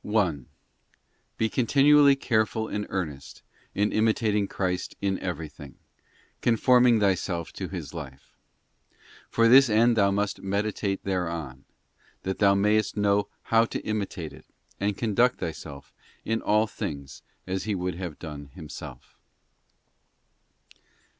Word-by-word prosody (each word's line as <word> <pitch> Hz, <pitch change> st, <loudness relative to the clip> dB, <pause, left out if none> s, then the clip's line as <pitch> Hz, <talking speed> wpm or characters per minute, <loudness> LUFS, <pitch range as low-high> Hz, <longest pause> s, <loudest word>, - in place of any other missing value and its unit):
1. 90 Hz, -, 0 dB, 0.9 s
Be 110 Hz, -, +2 dB
continually 140 Hz, +4 st, +5 dB
careful 110 Hz, -3 st, 0 dB
and 105 Hz, -1 st, -4 dB
earnest 70 Hz, -7 st, -5 dB, 0.3 s
in 105 Hz, +1 st, +1 dB
imitating 110 Hz, -2 st, +1 dB
Christ 90 Hz, -2 st, -3 dB
in 95 Hz, -1 st, -1 dB
everything, 75 Hz, -6 st, -6 dB, 0.7 s
conforming 120 Hz, 0 st, +4 dB
thyself 95 Hz, -4 st, 0 dB
to -, -, -5 dB
His -, -, -7 dB
life: 70 Hz, -5 st, -10 dB, 0.9 s
for 115 Hz, 0 st, +3 dB
this 130 Hz, +2 st, +7 dB
end 115 Hz, +2 st, +4 dB
thou 100 Hz, -3 st, +4 dB
must 100 Hz, +1 st, -1 dB
meditate 100 Hz, 0 st, -2 dB
thereon, 85 Hz, -8 st, -3 dB, 0.6 s
that 95 Hz, 0 st, -3 dB
thou 100 Hz, -1 st, +5 dB
mayest 105 Hz, +2 st, +1 dB
know 100 Hz, 0 st, +2 dB, 0.3 s
how 115 Hz, 0 st, +6 dB
to -, -, -4 dB
imitate 100 Hz, -7 st, -4 dB
it, -, -, -15 dB, 0.3 s
and 100 Hz, 0 st, -1 dB
conduct 120 Hz, +3 st, +2 dB
thyself 70 Hz, -4 st, -7 dB, 0.3 s
in 115 Hz, 0 st, -1 dB
all 105 Hz, +1 st, +3 dB
things 70 Hz, -9 st, -6 dB, 0.2 s
as 95 Hz, +1 st, -3 dB
He 105 Hz, -2 st, -1 dB
would 90 Hz, 0 st, -2 dB
have 85 Hz, -3 st, -6 dB
done 75 Hz, -3 st, -8 dB
Himself. 75 Hz, -7 st, -10 dB
100 Hz, 120 wpm, -26 LUFS, 85-110 Hz, 0.9 s, this